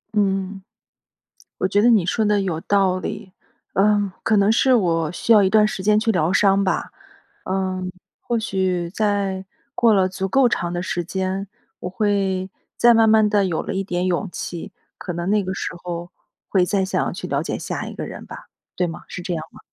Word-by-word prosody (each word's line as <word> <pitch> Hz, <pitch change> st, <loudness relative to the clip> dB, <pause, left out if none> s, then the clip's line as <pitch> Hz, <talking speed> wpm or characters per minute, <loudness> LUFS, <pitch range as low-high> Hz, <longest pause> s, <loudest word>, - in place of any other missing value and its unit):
嗯。 195 Hz, -1 st, 0 dB, 1.0 s
我 -, -, +1 dB
觉 205 Hz, +2 st, +2 dB
得 240 Hz, -, +5 dB
你 205 Hz, -7 st, +4 dB
说 220 Hz, +3 st, +1 dB
得 210 Hz, -1 st, +2 dB
有 165 Hz, -4 st, -2 dB
道 190 Hz, -2 st, +2 dB
理， 205 Hz, -2 st, -6 dB, 0.4 s
呃， 205 Hz, -1 st, +2 dB
可 220 Hz, -, +2 dB
能 200 Hz, +2 st, +4 dB
是 255 Hz, +3 st, +4 dB
我 165 Hz, -7 st, +1 dB
需 230 Hz, +6 st, +1 dB
要 210 Hz, -2 st, +7 dB
一 190 Hz, -, +2 dB
段 215 Hz, 0 st, +5 dB
时 195 Hz, -3 st, -4 dB
间 210 Hz, +1 st, +4 dB
去 225 Hz, 0 st, +1 dB
疗 180 Hz, -1 st, +1 dB
伤 200 Hz, 0 st, +4 dB
吧。 190 Hz, -, -1 dB, 0.6 s
嗯， 185 Hz, -1 st, -2 dB, 0.3 s
或 235 Hz, -, -1 dB
许 185 Hz, -5 st, -1 dB
在， 200 Hz, -2 st, -1 dB, 0.3 s
过 230 Hz, -2 st, +4 dB
了 190 Hz, -2 st, +3 dB
足 190 Hz, +1 st, -3 dB
够 255 Hz, +5 st, +4 dB
长 175 Hz, -6 st, -2 dB
的 175 Hz, -, -2 dB
时 175 Hz, -1 st, -2 dB
间， 190 Hz, +2 st, -3 dB, 0.3 s
我 180 Hz, -, -4 dB
会， 190 Hz, -1 st, 0 dB, 0.3 s
再 235 Hz, 0 st, +6 dB
慢 225 Hz, -1 st, +5 dB
慢 220 Hz, -1 st, +5 dB
地 205 Hz, -1 st, +2 dB
有 170 Hz, -3 st, -1 dB
了 -, -, -4 dB
一 195 Hz, -, 0 dB
点 180 Hz, -1 st, -2 dB
勇 185 Hz, +3 st, 0 dB
气， 175 Hz, -1 st, -6 dB, 0.3 s
可 180 Hz, -, -5 dB
能 170 Hz, +1 st, -3 dB
那 210 Hz, -1 st, +3 dB
个 185 Hz, -, -3 dB
时 190 Hz, -, -4 dB
候， 175 Hz, 0 st, -6 dB, 0.4 s
会 190 Hz, -3 st, +3 dB
再 190 Hz, +1 st, 0 dB
想 190 Hz, -, -1 dB
去 -, -, -6 dB
了 -, -, -1 dB
解 -, -, -3 dB
下 -, -, -4 dB
一 -, -, -8 dB
个 -, -, -5 dB
人 -, -, -8 dB
吧， -, -, -11 dB, 0.3 s
对 180 Hz, -, +1 dB
吗？ 165 Hz, -, -7 dB
是 180 Hz, -, -6 dB
这 175 Hz, 0 st, -3 dB
样 155 Hz, -1 st, -4 dB
吗？ -, -, -16 dB
190 Hz, 220 characters per minute, -22 LUFS, 180-210 Hz, 1.0 s, 要